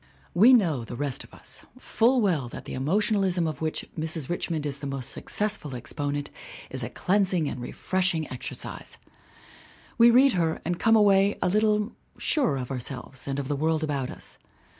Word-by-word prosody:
We 215 +9 +7
know 170 - +3
the 120 - -7
rest 135 0 -2
of - - -17
us - - -6
full 250 0 +2
well 165 - +1
that - - -9
the - - -7
emotion 205 - +1
alism 185 -4 +1
of 155 - -5
'which 155 -1 -2
Mrs. 160 -3 -1
Richmond 165 -3 -2
is 140 -1 -2
the 140 - -5
most 135 -3 -5
successful 205 -10 -2
exponent 145 +3 -3 0.4
is - - -3
a - - -3
cleansing 185 -4 +1
and 130 - -5
refreshing 175 +4 -1
exercise. 130 - -6 1.0
We 235 +1 +8
read 260 +3 +6
her 165 -3 0
and 175 +1 -2
come 225 0 +4
away 200 -1 +4
a 180 - +2
little 210 +2 +2 0.3
surer 265 - +1
of 125 0 -5
ourselves 130 +1 -2
and 135 0 -2
of 140 -2 -3
the 145 - -1
world 160 +2 0
about 140 -4 -2
us. - - -9
160 Hz, 180 wpm, -26 LUFS, 140-205 Hz, 1.0 s, We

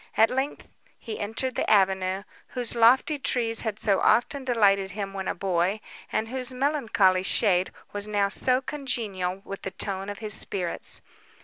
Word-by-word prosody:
At 225 +1 +5
length 265 +3 -3 0.2
he 220 - -7
entered 225 +5 -2
the - - -1
avenue, 190 -1 +2 0.2
whose 245 -3 -1
lofty 255 +6 +4
trees 230 -4 +1
had 220 -3 -3
so 200 -3 +2
often 245 +5 +2
delighted 200 -6 +3
him 200 -1 -5
when 190 -1 -4
a - - -1
boy, 185 +2 0 0.3
and 220 - -1
whose 255 +1 -1
melancholy 235 -9 +2
shade 185 -1 +2 0.2
was 205 0 -1
now 205 -1 +1
so 255 +5 +1
congenial 200 -10 -3
with 195 - -7
the - - -4
tone 195 0 -3
of 205 - -5
his 215 -2 -4
spirits. 180 -4 -2
210 Hz, 165 wpm, -26 LUFS, 195-245 Hz, 0.3 s, At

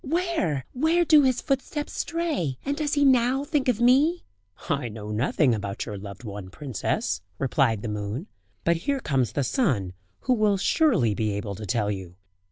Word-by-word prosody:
Where? 310 - -1
where 320 +6 +2
do 310 -2 +7
his 260 -3 +2
footsteps 290 +1 -2
stray? 325 - -2
And 280 +1 0
does 295 -1 -1
he 285 -1 +3
now 260 +1 +3
think 290 -2 0
of 240 -3 +2
me?" 275 +8 +4 0.4
"I 140 -7 -1
know 105 -1 -7
nothing 125 +4 +2
about 100 -2 -3
your 105 - -5
loved 100 +2 -9
one, 100 -4 -7
princess," 130 - -2 0.2
replied 130 -5 +1
the - - -3
moon; 105 - -4 0.4
"but 170 0 +2
here 275 +11 -1
comes 135 - 0
the 145 - 0
sun, 125 - 0 0.3
who 255 - +2
will 215 -4 +2
surely 195 - +3
be 105 0 -1
able 100 0 -4
to 105 +2 -7
tell 105 -3 0
you." 95 -3 -6
155 Hz, 175 wpm, -26 LUFS, -, 0.4 s, do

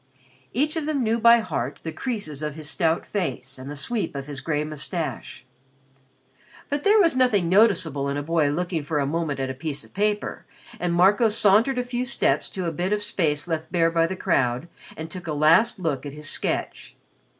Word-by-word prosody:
Each 295 +7 0
of 315 -2 -2
them 290 -4 0
knew 230 +1 +1
by 235 +1 +6
heart 140 - -4
the 160 - -4
creases 160 - -4
on 150 -1 -3
his 155 0 -8
stout 165 0 0
face 135 -10 -4
and 130 +2 -8
the 145 - -6
sweep 210 +5 -2
of 140 -1 -4
his 140 -2 -6
gray 150 +1 -1
moustache. 155 -2 -5 1.2
But 285 0 -2
there 425 +2 +5
was 335 -8 +4
nothing 235 -9 +3
noticeable 170 -9 +3
in 140 - -2
a 145 - -3
boy 160 -1 +1
looking 170 +1 -2
for 150 +1 -2
a 140 - +1
moment 150 -1 -2
at 135 0 -2
a - - -5
piece 140 +2 -5
of - - -19
paper, 210 +1 -2 0.3
and 180 - -1
Marco 195 +6 +4
sauntered 215 +5 +3
a 250 - +1
few 245 0 -3
steps 265 - +1
to 185 -2 -4
a 165 - -1
bit 180 +5 -1
of 210 0 0
space 160 -7 0
left 160 -1 -3
bare 165 -2 +2
by 165 0 +2
the 190 - -4
crowd 135 -6 0 0.3
and 160 +1 -7
took 180 -2 -7
a 155 - -2
last 165 +10 +4
glance 140 -5 -1
at 140 - -8
his 150 0 -9
sketch. - - -3
170 Hz, 205 wpm, -24 LUFS, 150-210 Hz, 1.2 s, by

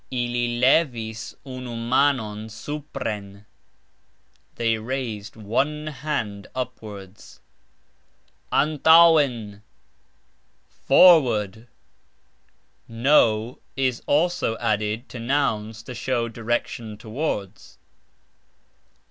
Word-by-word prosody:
"Ili 120 -1 -1
levis 120 -5 +1
unu 130 -2 -7
manon 115 -3 0
supren", 110 -6 -6 1.1
They 115 -1 0
raised 110 -4 -5
one 140 +8 -1
hand 130 -9 -4
upwards. 105 -6 -8 1.1
"Antauxen"! 150 -8 +4 1.2
Forward! 120 - +5 1.2
("n" 115 -2 +3 0.2
is 130 -3 0
also 160 -6 +1
added 105 +3 -1
to 125 - -8
nouns 115 -4 -1
to 125 - -8
show 120 0 -1
direction 115 -1 -3
towards. 110 -4 -5
120 Hz, 70 wpm, -23 LUFS, 110-135 Hz, 1.2 s, Forward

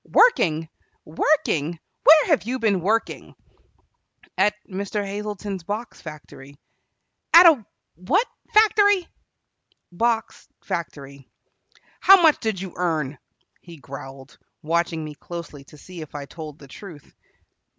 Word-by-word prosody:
"Working! 165 - +4 0.4
Working! 165 - 0 0.3
Where 310 0 +8
have 305 -6 +2
you 245 +4 -3
been 210 -6 +1
working?" 220 +6 -2 1.0
"At 205 +2 +2
Mr. 200 +2 -4
Hazleton's 205 -1 -5
box 215 +6 -6
factory." 145 -3 -12 0.8
"At 345 +2 +10
a 305 -9 +6 0.3
what 285 - 0 0.3
factory?" 410 -3 +4 0.8
"Box 225 +4 -2 0.2
factory." 140 -5 -7 0.7
"How 390 0 +7
much 320 -3 +4
did 220 -4 -2
you 185 -2 -7
earn?" 155 -6 -2 0.4
he 170 -2 -13
growled, 135 0 -11 0.2
watching 165 0 -1
me 155 -1 -7
closely 155 -2 -9
to 150 - -16
see 175 +3 -11
if 155 -1 -11
I 145 -1 -5
told 155 0 -10
the 140 - -15
truth. 160 0 -13
180 Hz, 120 wpm, -23 LUFS, 155-225 Hz, 1.0 s, At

